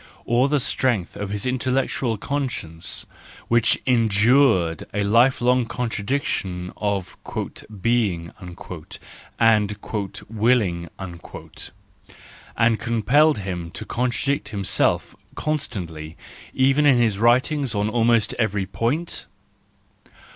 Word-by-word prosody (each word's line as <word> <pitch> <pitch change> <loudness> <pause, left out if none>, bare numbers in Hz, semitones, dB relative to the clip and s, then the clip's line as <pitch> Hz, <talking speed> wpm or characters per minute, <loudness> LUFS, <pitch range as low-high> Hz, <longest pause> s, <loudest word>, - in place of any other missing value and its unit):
Or 125 +4 +3
the 150 0 +2
strength 120 -7 0
of 100 -1 -4
his 100 0 -3
intellectual 130 -2 0
conscience, 120 - -3 0.4
which 115 -2 +3
endured 110 - +3
a 105 - +1
life 120 +6 +4
long 125 0 +3
contradiction 100 -6 -2
of 100 -4 -2 0.7
"being" 100 -8 +1
and 90 -2 -10 1.7
"willing," 105 -7 +1 1.7
and 115 -1 +3
compelled 120 +6 +3
him 90 -4 -4
to - - -6
contradict 125 -1 -1
himself 100 -3 +1 0.2
constantly 85 - -4 0.3
even 135 +3 +3
in 135 -3 +6
his 110 -4 +2
writings 125 +3 +2
on 100 +1 +1
almost 115 0 +2
every 105 -4 0
point 125 - -2
115 Hz, 95 wpm, -23 LUFS, 100-130 Hz, 1.7 s, in